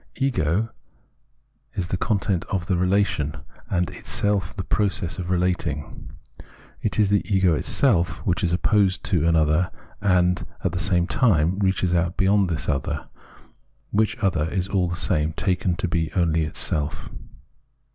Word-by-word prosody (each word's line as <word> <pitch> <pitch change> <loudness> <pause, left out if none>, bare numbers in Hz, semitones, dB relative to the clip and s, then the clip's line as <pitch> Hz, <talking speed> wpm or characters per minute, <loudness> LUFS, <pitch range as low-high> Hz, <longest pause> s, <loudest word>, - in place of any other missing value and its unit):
Ego 115 - 0 1.0
is 90 -2 -3
the - - 0
content 100 -3 0
of 95 -3 -2
the 95 -1 0
relation, 90 -5 +1 0.3
and 90 -2 0
itself 105 -2 -1
the 95 - -4
process 100 -2 -1
of 90 -1 -4
relating. 90 -5 -2 0.7
It 105 - -1
is 105 -2 +3
Ego 95 -4 +2
itself 85 - +2
which 90 0 0
is 85 - +1
opposed 95 +1 +2
to 85 -5 +1
an 85 - +3
other 80 +3 +2 0.3
and, 90 -3 +2 0.2
at - - +1
the 90 - -3
same 90 -1 +2
time, 95 - +2
reaches 95 -2 +1
out 85 0 0
beyond 100 -1 +3
this 80 -7 -3
other, 65 -2 -2 0.8
which 105 +1 +1
other 85 -6 0
is 95 0 -1
all 95 -3 +1
the 85 - -2
same 80 -3 0
taken 90 -1 0
to 95 - -2
be 80 -1 -1
only 80 -3 +2
itself. 75 -1 -1
90 Hz, 145 wpm, -23 LUFS, 85-100 Hz, 1.0 s, is